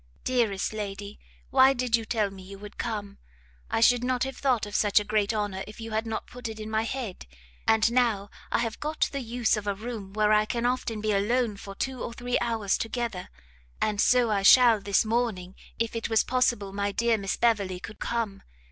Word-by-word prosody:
Dearest 225 -6 0
lady, 205 -1 -6 0.3
why 265 +1 +6
did 250 -2 +1
you 225 -1 -2
tell 215 -4 0
me 195 -1 -11
you 195 +1 -10
would 205 +1 -11
come? 205 -4 -4 0.5
I 225 - 0
should 245 +1 +5
not 250 -1 0
have 265 0 -4
thought 250 -6 +1
of 205 - -9
such 210 0 +4
a - - -3
great 210 -1 +1
honour 205 -3 -2
if 210 - -11
you 225 0 -7
had 220 +1 -1
not 220 -1 -3
put 245 -1 -8
it 220 -1 -7
in 215 0 -6
my 220 0 +2
head. 230 - -5 0.4
And 220 +1 +4
now 230 -5 +1 0.2
I - - +3
have 230 -1 -2
got 305 +1 0
the 280 - -3
use 240 -1 +1
of 210 -1 -5
a 200 - 0
room 210 -2 -7
where 215 0 +3
I 210 0 +4
can 235 +2 -2
often 245 -3 -1
be 215 0 0
alone 215 +3 +1
for 200 0 -9
two 260 +3 -3
or 235 - -5
three 245 +1 -1
hours 225 -4 0
together. 225 -5 -3 0.5
And 210 -1 +1
so 245 -3 +4
I 200 -2 +1
shall 230 +1 +7
this 200 +1 +2
morning, 215 -5 -1 0.2
if 230 0 -2
it 230 - -2
was 225 -1 +3
possible 240 -6 0
my 200 0 -1
dear 230 +1 +1
Miss 195 -1 -2
Beverley 200 -6 +1
could 200 +4 -10
come. 225 -4 -2
220 Hz, 215 wpm, -27 LUFS, 205-240 Hz, 0.5 s, shall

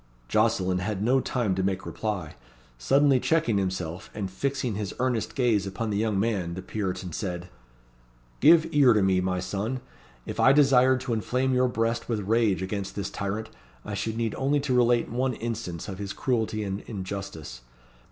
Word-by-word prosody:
Jocelyn 95 - +2
had 100 +1 -2
no 130 +4 +3
time 120 -6 0
to 95 - -1
make 95 0 -1
reply. 100 -8 -4 0.5
Suddenly 135 - +4
checking 120 -9 +2
himself, 90 -2 -3
and 100 -3 -3
fixing 135 +2 -2
his 100 -1 -4
earnest 125 -3 -1
gaze 115 -7 +2
upon 110 +3 -3
the 100 - 0
young 105 -2 +1
man, 100 -6 -1
the 95 - -6
Puritan 95 -3 -3
said 90 -3 -4 0.9
"Give 160 +3 +7
ear 140 -5 +6
to 105 -3 +3
me, 95 -1 +3
my 90 0 -1
son. 105 +7 -3 0.5
If - - -6
I 135 - +6
desired 130 -3 +5
to 130 -3 -2
inflame 125 +4 0
your 125 0 +3
breast 115 0 -1
with 110 -3 0
rage 105 -2 +1
against 95 0 -4
this 100 -1 -3
tyrant, 105 +3 -4 0.3
I - - -5
should 110 0 -2
need 115 -2 -1
only 140 +2 +2
to 140 -2 -1
relate 120 -1 +3
one 125 +1 -1
instance 110 -8 -5
of 95 -2 -6
his 100 -1 -4
cruelty 110 -4 -1
and 100 0 -3
injustice. 95 - -6
110 Hz, 175 wpm, -27 LUFS, 95-125 Hz, 0.9 s, Give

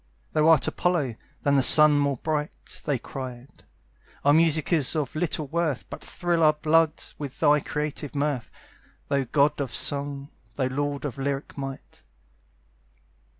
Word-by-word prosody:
"Thou 155 +1 +3
art 160 - +5
Apollo, 165 -9 0 0.3
than 140 0 +2
the - - +4
sun 150 +2 +7
more 140 -2 0
bright!" 150 +2 -4
They 145 -3 0
cried. 125 0 -9 0.6
"Our 145 - +6
music 160 +1 +3
is 155 -2 +2
of 150 -3 -2
little 155 -1 -2
worth, 160 -2 -2
But - - -8
thrill 175 -2 -1
our 155 -1 +5
blood 160 +1 +1 0.2
with 140 -2 -7
thy 150 -1 +4
creative 150 0 -4
mirth 140 -4 -1 0.6
Thou 140 -1 +1
god 145 +3 +2
of 135 -4 -4
song, 140 0 -2 0.2
thou 130 -2 -1
lord 145 +2 -3
of 140 -2 -5
lyric 140 +1 -3
might!" 135 -1 -8
145 Hz, 150 wpm, -25 LUFS, 140-155 Hz, 0.6 s, sun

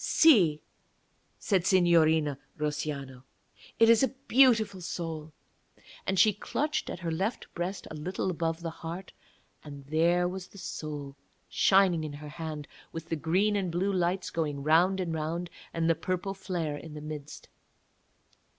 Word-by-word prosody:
'See,' 185 - +5 0.7
said 190 -4 +1
Signorina 160 -6 +4 0.2
Russiano, 150 -3 -3 0.6
'it 225 - +6
is 230 -1 +6
a 265 - +4 0.2
beautiful 225 -7 +4
soul.' 165 -2 -5 0.8
And 190 - 0
she 210 +3 +6
clutched 300 +9 -2
at 175 - -6
her 170 -1 -2
left 195 +8 -2
breast 180 +3 -4
a - - -5
little 180 +5 -2
above 165 -1 -2
the 165 - -3
heart, 170 +3 -7 0.5
and 140 -2 -10
there 170 +4 +2
was 180 0 -6
the 200 - -16
soul 145 -6 -6 0.3
shining 190 -4 +4
in 150 -2 -5
her 150 +1 -8
hand, 155 -2 -6 0.2
with 165 0 -7
the 165 - 0
green 185 +7 +1
and 190 -4 -1
blue 190 +4 0
lights 180 +1 0
going 150 -4 -2
round 175 +5 +4
and 175 -3 -2
round 165 +2 -3 0.2
and 165 0 0
the 165 - +5
purple 185 +4 -3
flare 175 -6 -3
in 155 +1 -10
the 150 - -7
midst. 150 -1 -8
170 Hz, 150 wpm, -29 LUFS, 155-190 Hz, 0.8 s, it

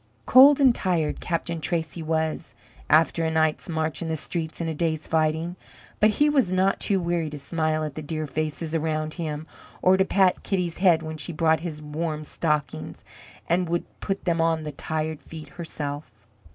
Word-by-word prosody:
Cold 275 +3 +8
and 265 -3 +6
tired 175 -8 0
Captain 170 -1 -3
Tracy 165 0 -2
was, 160 0 -2 0.3
after 165 +2 +4
a 160 - +1
night's 160 0 0
march 160 -1 -2
in 165 - -3
the 160 0 -1
streets 160 +1 -5
and 170 - -2
a 160 - -1
day's 160 0 -1
fighting; 160 +2 0 0.4
but 215 - +6
he 290 +8 +3
was 275 -10 +2
not 185 +1 +2
too 195 -2 +1
weary 170 -2 -1
to 150 - -7
smile 155 +1 -1
at 150 -2 -4
the 155 - -6
dear 155 +1 -3
faces 155 +2 -3
around 155 -1 -1
him, 155 -3 -4 0.3
or 185 +1 +4
to 190 - +4
pat 190 -1 +2
Kitty's 180 -4 -2
head 175 -4 +4
when 155 0 -5
she 150 +3 -5
brought 160 0 +2
his 155 -2 -6
warm 155 +1 -3
stockings 150 - -2 0.4
and 175 0 +1
would 170 0 -1
put 195 -1 -3
them 170 -2 +1
on 165 -1 +1
the 150 - -4
tired 155 +1 -3
feet, 160 -2 -10
herself. 150 -5 -5
160 Hz, 185 wpm, -25 LUFS, 155-175 Hz, 0.4 s, Cold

